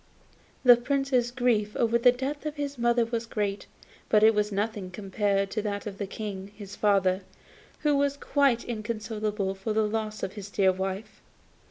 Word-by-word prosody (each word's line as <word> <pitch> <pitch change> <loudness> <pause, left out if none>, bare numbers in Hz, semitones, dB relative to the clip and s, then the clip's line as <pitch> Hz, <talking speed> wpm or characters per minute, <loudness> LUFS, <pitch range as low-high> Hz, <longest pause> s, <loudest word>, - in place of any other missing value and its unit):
The 245 -2 +8
Prince's 265 -1 +1
grief 240 -4 +1
at 230 -2 +1
the 245 - +7
death 275 +4 -4
of 300 - -4
his 285 -3 -4
mother 235 0 +3
was 230 0 -3
great, 205 -3 -2 0.4
but 215 -1 +4
it 220 +1 +7
was 210 0 0
nothing 205 -1 -2
compared 195 +1 -1
to 215 - -1
that 205 -1 -3
of 200 -2 -6
the 200 - -3
King, 200 -1 -6
his 205 -1 -9
father, 195 -2 +2 0.6
who 295 -1 +3
was 280 0 +1
quite 275 -5 +2
inconsolable 215 -3 -3
for 195 +3 -3
the 215 0 +2
loss 215 0 -3
of 190 - -3
his 205 -2 -8
dear 195 -1 +3
wife. 190 +2 -5
215 Hz, 175 wpm, -27 LUFS, 200-240 Hz, 0.6 s, The